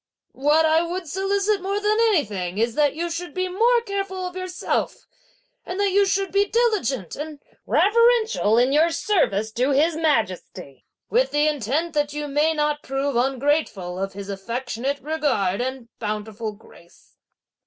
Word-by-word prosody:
What 300 +4 +3
I 315 +1 +4
would 345 +1 -4
solicit 395 +4 0
more 395 +2 -1
than 420 +1 +1
anything 210 - +1
is 230 +1 +1
that 290 +2 +2
you 340 +2 -2
should 335 -2 -5
be 370 0 0
more 465 +6 +3
careful 390 -2 -3
of 360 0 -6
yourself, 370 -1 -3 0.6
and 365 +2 -5
that 405 -1 +2
you 400 +1 +4
should 390 0 0
be 400 +1 +3
diligent 400 - 0
and 300 0 -7 0.3
reverential 450 - +3
in 250 +3 +3
your 315 +3 +4
service 220 - 0
to 250 +4 0
His 310 +4 +3
Majesty, 220 - -2 0.3
with - - +3
the 295 +1 +2
intent 300 +4 -1
that 290 -1 0
you 295 0 -4
may 295 +3 +2
not 300 0 0
prove 270 0 -2
ungrateful 255 - 0
of 195 0 -3
his 200 0 -7
affectionate 240 +7 -3
regard 265 -11 0
and 260 -1 -4
bountiful 215 0 -4
grace." 175 -4 -20
300 Hz, 155 wpm, -23 LUFS, 235-375 Hz, 0.6 s, I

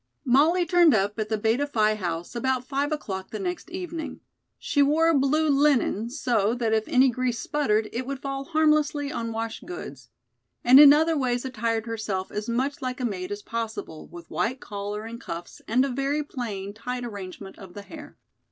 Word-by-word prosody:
Molly 310 +8 +4
turned 345 -3 +5
up 205 +2 0
at 215 -1 -2
the 220 - 0
Beta 225 +7 +1
Phi 215 -6 +2
House 175 -2 -4
about 255 +1 -1
five 280 +2 -1
o'clock 190 -11 -4
the - - -5
next 360 -3 -4
evening. 345 -3 -5 0.4
She 285 - 0
wore 305 +4 +4
a - - +4
blue 300 +3 +2
linen 275 -6 +2
so 240 -5 +1
that 230 -3 0
if 220 0 +1
any 260 +1 +5
grease 250 0 -1
sputtered 225 -7 0
it 250 +2 -3
would 275 0 -3
fall 275 0 -4
harmlessly 300 -2 +2
on 230 -4 -3
wash 225 0 -4
goods, 135 -8 -9 0.5
and 255 +3 +8
in 290 -1 +11
other 320 +2 +4
ways 250 -3 0
attired 230 -3 -1
herself 215 -5 -3
as 210 +2 -4
much 265 +5 -1
like 255 0 -3
a 250 - -1
maid 185 -4 -3
as 205 0 -5
possible 225 -8 -5
with 175 -1 -11
white 255 +4 -1
collar 205 0 -5
and 230 +1 -8
cuffs 170 -1 -7
and 250 +4 +3
a - - -2
very 275 +3 -1
plain 205 -8 -5
tight 245 +3 -5
arrangement 195 -3 -8
of 190 -3 -12
the 205 - -7
hair. 300 +7 -11
245 Hz, 190 wpm, -26 LUFS, 215-285 Hz, 0.5 s, in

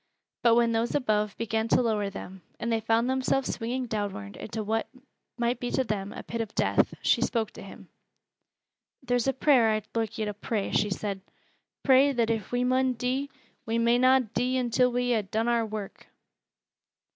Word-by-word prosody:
But 235 -1 +5
when 235 -1 +3
those 230 +1 0
above 210 -6 0
began 225 0 -1
to 230 - +3
lower 210 -3 0
them, 190 -1 -9 0.2
and 235 - -2
they 225 - +2
found 225 +2 +1
themselves 260 +1 0
swinging 250 +3 -3
downward 200 - -4
into 220 0 -5
what 220 +2 -1 0.5
might 240 0 0
be 245 - -3
to 260 - +1
them 205 -4 -3
a - - -8
pit 230 0 -4
of 220 -2 -6
death, - - +2
she - - +3
spoke 225 -3 0
to - - -11
him. - - -12 1.2
"Theer's 245 0 +1
a 270 - +2
prayer 260 -4 +4
I'd 215 -1 -1
loike 225 -2 -2
yo' 220 - -1
to 210 - -3
pray," 205 0 -3
she 210 - +2
said. 195 0 -3 0.6
"Pray 270 +1 +5
that 230 -2 +1
if 220 -3 -3
we 245 0 +1
mun 255 +1 +2
dee, 255 +4 -2 0.4
we 225 +1 0
may 235 +1 +3
na 260 +1 +5
dee 250 +2 0
until 250 0 +2
we 245 0 +1
ha' 220 - +2
done 225 +2 0
our 235 -1 +1
work." 210 -2 -7
230 Hz, 190 wpm, -27 LUFS, 215-250 Hz, 1.2 s, But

